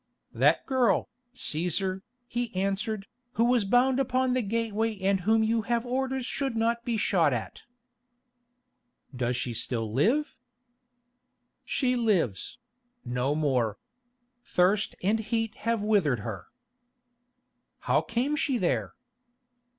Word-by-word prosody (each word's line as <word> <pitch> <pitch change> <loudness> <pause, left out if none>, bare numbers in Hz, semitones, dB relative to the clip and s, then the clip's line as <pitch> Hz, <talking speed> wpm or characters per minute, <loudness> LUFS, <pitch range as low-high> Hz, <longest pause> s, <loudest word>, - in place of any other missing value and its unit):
"That - - +3
girl, 260 -3 +2 0.3
Cæsar," 185 +1 0 0.2
he 240 0 -3
answered, 195 +2 -1 0.3
"who 230 - +2
was 240 -3 +3
bound 250 +5 +3
upon 255 -1 +1
the 255 - +1
gateway 225 0 -1
and 195 0 +2
whom 220 +4 +3
you 225 +1 +1
have 235 +2 -1
orders 260 +1 -1
should 270 -1 -2
not 230 +1 0
be 235 -1 -1
shot 170 -9 +3
at." 115 - -5 1.5
"Does 125 0 -1
she 120 0 -2
still 115 -1 -2
live?" 240 - +1 1.3
"She 255 -2 0
lives—no 225 - -2
more. 125 -9 +1 0.7
Thirst 195 +2 +1
and 210 +4 +2
heat 225 0 -1 0.2
have 230 -3 +1
withered 180 - +2
her." 100 -5 -6 1.3
"How - - +2
came 245 +6 -1
she 275 -3 0
there?" 180 -6 -1
220 Hz, 115 wpm, -28 LUFS, 175-245 Hz, 1.5 s, That